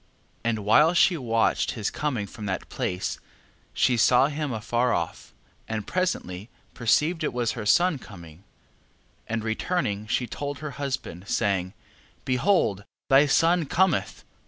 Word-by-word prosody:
11:6. 115 - +1
And 110 -2 -1
while 150 +10 +5
she 180 0 +5
watched 115 -6 +1
his 110 -4 -2
coming 130 -9 -2
from 105 +1 -8
that 95 - -4
place, 90 +1 -3 0.5
she 125 -2 +2
saw 125 +4 +5
him 150 -1 -3
afar 120 +2 0
off, 85 -1 -4 0.4
and 110 -2 -3
presently 120 - -2 0.2
perceived 155 +8 +1
it - - 0
was 120 -2 -1
her 110 -3 -5
son 175 - +3
coming: 85 -6 -13 0.8
and 115 -1 -2
returning 110 - -2
she 125 +3 0
told 145 +3 -5
her 150 -1 -6
husband, 130 -9 -4
saying: 95 -2 0 0.5
Behold 125 - +1 0.3
thy 140 +2 +6
son 165 +3 +3
cometh. 190 +2 +1
120 Hz, 140 wpm, -25 LUFS, 105-150 Hz, 0.8 s, thy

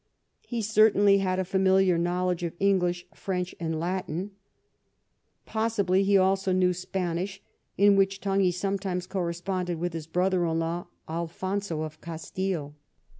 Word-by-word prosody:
He 235 -2 -2
certainly 205 -2 +5
had 185 -1 0
a 190 - 0
familiar 190 -1 +3
knowledge 180 +1 0
of 170 -1 -3
English, 180 -3 +1
French, 180 -2 -3
and 160 -1 -2
Latin. 180 +2 -3 1.1
Possibly 215 -4 +1
he 200 0 +4
also 190 0 +2
knew 185 0 +3
Spanish, 185 +1 -3 0.4
in 200 +1 +6
which 195 0 +2
tongue 195 0 0
he 185 -2 +4
sometimes 190 0 -2
corresponded 180 -1 -2
with 175 +1 -2
his 160 -2 -5
brother 180 +2 +1
in 165 0 0
law 165 +2 -2 0.2
Alfonso 170 +1 -3
of 155 0 -8
Castile. 165 -1 -4
185 Hz, 135 wpm, -27 LUFS, 175-195 Hz, 1.1 s, in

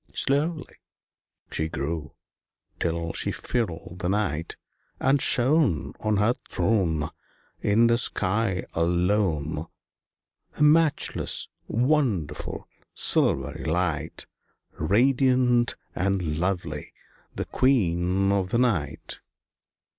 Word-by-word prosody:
Slowly 150 +3 +2 0.7
she 80 0 -1
grew 75 +1 -4 0.6
till 85 0 -2
she - - +1
filled 90 -7 -4
the 90 - -2
night, 95 -6 -2 0.4
And 135 0 +2
shone 130 - +4
On 110 -1 0
her 105 +4 +3 0.2
throne 80 -9 0 0.5
In 110 +3 +3
the 115 0 +3
sky 95 -3 +1
alone, 85 -3 0 0.9
A - - +1
matchless, 155 0 +2 0.2
wonderful, 120 - -1 0.3
silvery 70 +4 +3
light, 85 0 -2 0.5
Radiant 125 - +2 0.2
and 90 -5 -1
lovely, 90 -5 -3 0.4
the - - -3
Queen 95 -6 +1
of 95 -2 0
the 115 - +1
night. 105 - -1
95 Hz, 90 wpm, -25 LUFS, 85-120 Hz, 0.9 s, shone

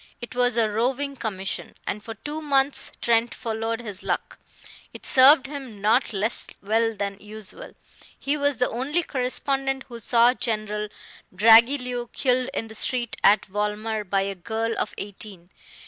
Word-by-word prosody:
It 240 - -8
was 245 -1 +2
a 225 -2 +4
roving 255 +6 -1
commission, 195 -6 -4
and 210 +1 -4
for 225 +1 -7
two 295 +8 -6
months 280 -2 +1
Trent 235 0 +2
followed 225 0 -3
his 205 -4 -6
luck. - - -3 0.6
It - - -10
served 270 +2 +7
him 270 -7 -7
not 220 +6 +2
less 215 +2 -1
well 225 +2 0
than 200 -1 -4
usual. 215 - -8 0.4
He 280 +2 -1
was 285 -3 +1
the 250 - +2
only 285 +9 -1
correspondent 270 0 -1
who 235 -1 -8
saw 235 +2 +4
General 215 -4 -2 0.5
Dragilew 240 +3 +5
killed 255 -1 +1
in 225 - -2
the 220 - -10
street 240 +1 0
at 205 +2 +5
Volmar 210 +2 -2
by 195 0 0
a 195 0 -3
girl 225 +4 -3
of - - -3
eighteen. 195 -3 -8
230 Hz, 155 wpm, -24 LUFS, 210-255 Hz, 0.6 s, served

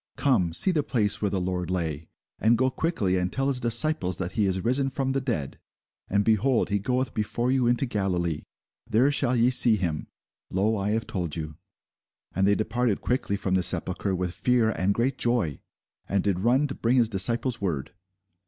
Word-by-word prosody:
Come, 120 - +1
see 140 - +6
the 160 -4 +1
place 110 -7 0
where 105 - 0
the 95 - -2
Lord 90 -1 -3
lay. 80 -4 -3 0.3
And 115 +3 +3
go 130 +2 +1
quickly, 110 - -1
and 90 0 -2
tell 135 +1 -1
his 130 -2 +2
disciples 120 - +3
that 90 -1 -4
he 105 0 0
is 95 -1 -2
risen 135 +3 +1
from 135 0 -2
the 135 0 -1
dead; 115 - -4 0.5
and, 100 +1 +1
behold, 115 +3 +1
he 100 0 0
goeth 125 +3 -2
before 120 +3 -1
you 130 -2 +1
into 120 +2 +1
Galilee; 90 - -2 0.5
there 125 +5 +3
shall 125 -3 +2
ye 120 +1 +3
see 120 -3 +5
him: 85 -7 -3 0.4
lo, 105 +4 0
I 100 0 -2
have 115 +2 -1
told 85 -5 -4
you. 75 -2 -6 0.8
And 95 0 +1
they 100 - +3
departed 110 0 -1
quickly 125 -5 -2
from 95 -1 -3
the 95 - +2
sepulchre 95 +2 +2
with 90 -1 -3
fear 120 -1 +1
and 95 -2 0
great 130 +3 -1
joy; 120 - -1 0.5
and 100 -1 0
did 100 -3 -1
run 125 +8 +2
to - - -4
bring 120 +1 0
his 120 -2 +4
disciples 115 +4 0
word. 80 -6 -3
110 Hz, 195 wpm, -25 LUFS, 95-125 Hz, 0.8 s, see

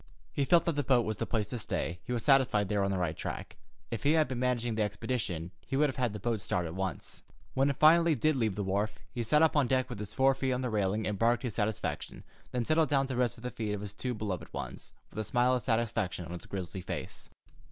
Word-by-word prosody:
He 140 - +1
felt 170 +3 +5
that 170 - +1
the 145 - +1
boat 125 -4 +3
was 110 -1 -2
the - - -2
place 105 -3 -1
to 125 - -3
stay. 90 -4 -2
He - - -6
was 120 -2 -1
satisfied 130 -8 +4
they 105 - 0
were 100 - +2
on 100 - +1
the 95 - 0
right 85 -3 -1
track. - - -5 0.4
If 115 - -3
he 145 +2 +4
had 155 -3 +4
been 125 -1 -3
managing 120 -2 0
the 110 - -1
expedition, 105 -5 -2 0.2
he 135 - -1
would 150 +1 +4
have 135 - -6
had 125 -3 +1
the 105 - -6
boat 115 0 -1
start 90 -1 -1
at 80 - -5
once. 95 -5 -4 0.3
When 135 +1 +3
it 140 - 0
finally 165 +2 +6
did 155 +1 +2
leave 110 -6 0
the 105 - -2
wharf, 100 +3 -1
he 120 - -3
sat 150 +8 +4
up 160 - +4
on 145 -4 +4
deck 130 0 +1
with 115 - -5
his 105 -1 -6
fore 135 0 +5
feet 130 0 -1
on 125 +1 -1
the 125 - -1
railing 105 0 0
and 105 -2 -2
barked 120 +2 +3
his 120 -5 -2
satisfaction, 110 0 -2 0.3
then 125 -2 -1
settled 155 0 +3
down 135 -1 +3
to 130 - -2
rest 120 -2 +1
at 115 - -14
the 125 - -3
feet 110 -3 -3
of 105 - -3
the 105 - -5
two 125 +5 -4
beloved 95 -6 -4
ones, - - -6 0.2
with 110 - -6
a - - 0
smile 120 +4 +2
of 125 - +1
satisfaction 110 -6 0
on 85 - -9
his 90 - -7
grizzly 95 -1 -5
face. - - -5
115 Hz, 270 wpm, -31 LUFS, 105-130 Hz, 0.4 s, finally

